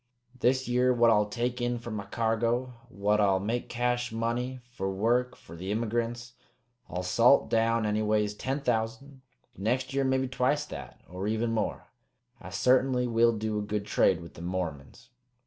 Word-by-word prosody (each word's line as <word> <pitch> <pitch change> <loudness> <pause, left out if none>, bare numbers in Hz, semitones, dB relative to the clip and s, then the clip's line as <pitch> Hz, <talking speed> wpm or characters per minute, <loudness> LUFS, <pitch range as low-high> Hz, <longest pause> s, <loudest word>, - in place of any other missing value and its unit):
This 130 +1 +2
year, 125 +1 +3
what 120 -2 +4
I'll 105 -1 +3
take 120 +2 -2
in 120 0 0
for 120 0 -7
my 105 -2 -4
cargo, 115 +2 0 0.2
what 105 -1 +1
I'll 95 -2 +3
make 115 +5 -2
cash 120 0 -1
money 120 +3 -2
fer 95 -6 -3
work 120 +6 +1
fer 85 - -13
the 95 +4 -5
immygrints, 120 +2 -2 0.6
I'll 90 0 -3
salt 115 +9 +4
down 115 0 +2
anyways 105 0 +1
ten 135 +6 -3
thousand; 130 +3 -2 0.3
next 125 +6 -1
year 135 0 +1
maybe 130 0 +1
twicet 135 +3 0
that, - - -9
or 90 +3 -5
even 110 +2 0
more. 110 -2 -2 0.5
I - - -9
sartainly 125 +6 +2
will 115 0 +3
do 110 0 -2
a - - -2
good 105 0 -3
trade - - +2
with 85 - -11
them 85 - -8
Mormons." 90 - -5
115 Hz, 165 wpm, -29 LUFS, 105-125 Hz, 0.6 s, what